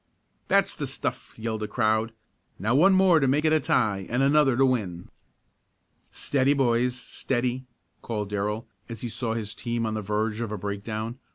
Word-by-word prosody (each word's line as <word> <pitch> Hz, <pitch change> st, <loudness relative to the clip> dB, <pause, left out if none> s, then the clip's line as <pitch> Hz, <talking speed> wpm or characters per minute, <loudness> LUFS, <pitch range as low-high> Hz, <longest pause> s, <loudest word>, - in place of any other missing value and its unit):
"That's -, -, +2 dB
the -, -, -4 dB
stuff!" -, -, -5 dB
yelled 110 Hz, -1 st, -3 dB
the 105 Hz, -, -3 dB
crowd. 110 Hz, -1 st, +1 dB, 0.5 s
"Now 110 Hz, +5 st, 0 dB
one 180 Hz, +8 st, +6 dB
more 185 Hz, -3 st, +5 dB
to 135 Hz, -, +2 dB
make 145 Hz, +4 st, +2 dB
it 155 Hz, -, +4 dB
a 155 Hz, -, +4 dB
tie 105 Hz, -8 st, 0 dB
and 125 Hz, +3 st, +1 dB
another 140 Hz, -3 st, +4 dB
to 135 Hz, -, +5 dB
win!" 100 Hz, -9 st, -1 dB, 1.0 s
"Steady, 140 Hz, 0 st, +1 dB
boys! 125 Hz, -2 st, +2 dB
Steady!" 125 Hz, 0 st, -3 dB, 0.3 s
called 105 Hz, -3 st, -4 dB
Darrell, 105 Hz, +2 st, -2 dB, 0.2 s
as 115 Hz, -2 st, -7 dB
he 120 Hz, -, -3 dB
saw 115 Hz, 0 st, -2 dB
his 105 Hz, -2 st, -4 dB
team 115 Hz, 0 st, -3 dB
on 110 Hz, -, -2 dB
the 110 Hz, -, -2 dB
verge 105 Hz, +2 st, -1 dB
of 115 Hz, -3 st, -3 dB
a 105 Hz, -, -3 dB
breakdown. 110 Hz, +4 st, -4 dB
115 Hz, 180 wpm, -26 LUFS, 110-130 Hz, 1.0 s, one